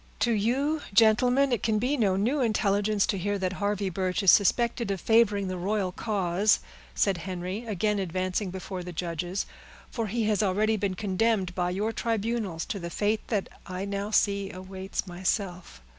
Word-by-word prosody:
"To 240 - +3
you, 265 +8 +1
gentlemen, 245 +5 +5
it 235 -4 +1
can 220 -1 +1
be 250 +7 +1
no 205 -8 +2
new 240 +9 +1
intelligence 205 -2 +2
to 195 - -1
hear 205 +3 -1
that 190 -1 -1
Harvey 200 -1 -1
Birch 185 +2 -1
is 195 - +8
suspected 235 +2 +2
of 195 -1 -1
favoring 210 -2 +3
the 185 0 -3
royal 195 0 0
cause," 200 -1 +1 0.4
said 195 -2 +2
Henry, 185 +5 -5
again 210 0 0
advancing 185 +2 -1
before 185 0 -6
the 180 0 -7
judges; 175 +3 -3 0.5
"for 230 -2 -2
he 230 +3 -1
has 210 -1 +2
already 210 +2 +2
been 200 -2 -1
condemned 200 -1 0
by 175 0 0
your 205 +5 -1
tribunals 225 -6 -2
to 200 - -4
the 170 -1 -5
fate 210 +4 -1
that 205 -4 -1 0.2
I 185 +1 -4
now 200 +1 -3
see 200 -2 +2
awaits 190 +1 -5
myself. 180 - -3
200 Hz, 175 wpm, -27 LUFS, 185-220 Hz, 0.5 s, is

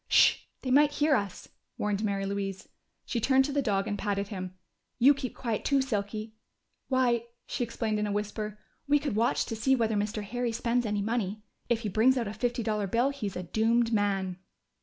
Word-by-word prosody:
"Sh! - - +6 0.3
They 255 - -1
might 290 +2 +5
hear 295 0 +3
us!" 200 -5 -3 0.3
warned 210 0 -1
Mary 200 -2 0
Louise. 195 -1 -3 0.4
She 235 - -2
turned 265 +3 +4
to 285 - -3
the 285 - +2
dog 200 -6 0
and 205 - -2
patted 200 -1 -1
him. 185 -2 -5 0.4
"You 265 +4 +7
keep 270 -3 -5
quiet 230 -4 -2
too, 280 -1 +3
Silky.... 215 -3 -2 0.5
Why," 245 -3 +2 0.2
she - - -2
explained 220 -2 -2
in 210 - 0
a - - -2
whisper, 210 0 -3 0.3
"we 290 +1 +5
could 285 -6 -2
watch 230 +3 +2
to 225 - -4
see 265 +5 +3
whether 225 -3 +1
Mr. 210 +1 -1
Harry 240 +3 -2
spends 240 +1 0
any 205 -1 -1
money. 215 -2 -2 0.3
If 235 -1 +2
he 215 - -2
brings 235 +7 +4
out 235 -3 -1
a 205 - -4
fifty 240 0 -1
dollar 210 -2 0
bill, 235 +7 +2
he's 220 -9 -5
a 180 - -3
doomed 230 +5 +2
man!" 195 -3 0
220 Hz, 200 wpm, -29 LUFS, 205-245 Hz, 0.5 s, You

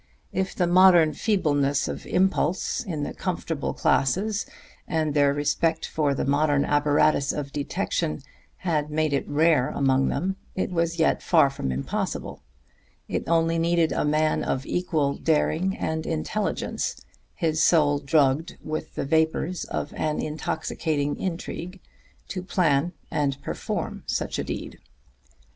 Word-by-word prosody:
If 190 0 -1
the 180 - +2
modern 175 -3 +6
feebleness 145 -8 +1
of - - -6
impulse 185 0 +1
in 160 -9 -4
the - - -4
comfortable - - -3
classes, 200 - +1 0.4
and 155 -3 0
their 145 -1 +4
respect 160 +3 0
for 145 -3 0
the - - -1
modern 145 0 +2
apparatus 145 -1 +3
of 140 -2 -4
detection, 155 0 -2 0.4
had 150 -4 0
made 155 -1 0
it 140 - -1
rare 150 -3 +3
among 135 -1 +2
them, 190 +6 -1 0.2
it 185 - -1
was 170 -1 0
yet 160 - +2
far 155 -6 +4
from 65 - -3
impossible; 65 +2 -3 0.7
it - - -3
only 165 0 +2
needed 170 -1 +2
a - - 0
man 155 +1 +1
of 130 - -2
equal 155 -6 0
daring 165 +5 +1
and 160 0 -2
intelligence, 80 - -2 0.3
his 160 -1 0
soul 150 -3 +4
drugged 140 +1 +1
with 155 0 -5
the - - -2
vapors 160 +3 0
of 145 - -4
an 155 -1 -1
intoxicating 155 -1 -2
intrigue, 180 0 -5 0.5
to 185 - -3
plan 170 -4 +1 0.2
and 140 -2 0
perform - - -4
such - - -2
a - - 0
deed. - - -6
155 Hz, 135 wpm, -25 LUFS, 145-170 Hz, 0.7 s, modern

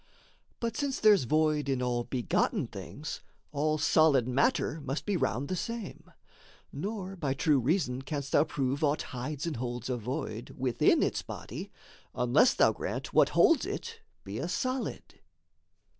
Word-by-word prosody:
But 230 -1 -2
since 280 -2 -1
there's 210 - +5
void 155 +1 +1
in 135 -2 +1
all 120 -1 -1
begotten 125 -3 0
things, - - -7 0.3
All 155 +2 0
solid 150 -5 +4
matter 140 +4 +1
must 135 +2 -3
be 205 - 0
round 130 - 0
the 185 - -2
same; 230 +2 -5 0.6
Nor, 195 +4 -4
by 140 -7 -2
true 145 -1 +3
reason 130 -1 0
canst 140 0 -4
thou 145 - +5
prove 140 -1 -2
aught 150 +1 +2
hides 135 +4 -4
And 160 -6 -3
holds 120 +1 -4
a 125 - -1
void 120 -1 -5
within 125 -2 +3
its - - 0
body, - - -7 0.5
unless 125 - +4
Thou - - +5
grant - - -5
what - - +5
holds 330 +1 +5
it 455 +3 -5 0.2
be - - -6
a - - -2
solid. 255 0 -3
145 Hz, 155 wpm, -30 LUFS, 130-180 Hz, 0.6 s, there's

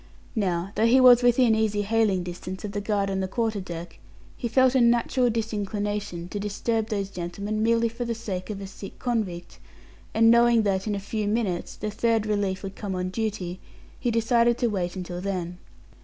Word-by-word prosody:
Now, 185 -3 -1
though 225 +1 +2
he 250 +3 +5
was 250 -1 +8
within 245 -1 +4
easy 215 -2 +1
hailing 210 -3 +1
distance 180 +2 -6
of 205 - -4
the 205 0 -3
guard 200 -1 0
on 190 - -1
the 190 - -1
quarter 220 0 -1
deck, 170 -2 -8 0.4
he 240 - -3
felt 260 +2 +4
a 260 - +4
natural 240 +1 +3
disinclination 205 -4 -3
to 205 - -4
disturb 215 +2 -1
those 200 -3 -3
gentlemen 200 +4 -4
merely 230 +1 +3
for 230 +2 -5
the 235 -1 -2
sake 190 -4 -5
of 205 -2 -4
a - - -5
sick 195 +1 -10
convict, 210 -8 -3 0.6
and 225 +1 +6
knowing 235 -1 +5
that, 195 0 0
in 210 - 0
a - - -2
few 210 +1 -3
minutes, 205 -5 -1
the 215 - -4
third 225 0 +1
relief 205 -3 -1
would 195 0 -6
come 200 -3 -4
on 180 0 -2
duty, 190 -4 -3 0.4
he 245 - 0
decided 235 +1 +3
to 240 - +1
wait 180 -3 -2
until 180 -1 -5
then. 180 -2 -3
210 Hz, 195 wpm, -26 LUFS, 190-230 Hz, 0.6 s, was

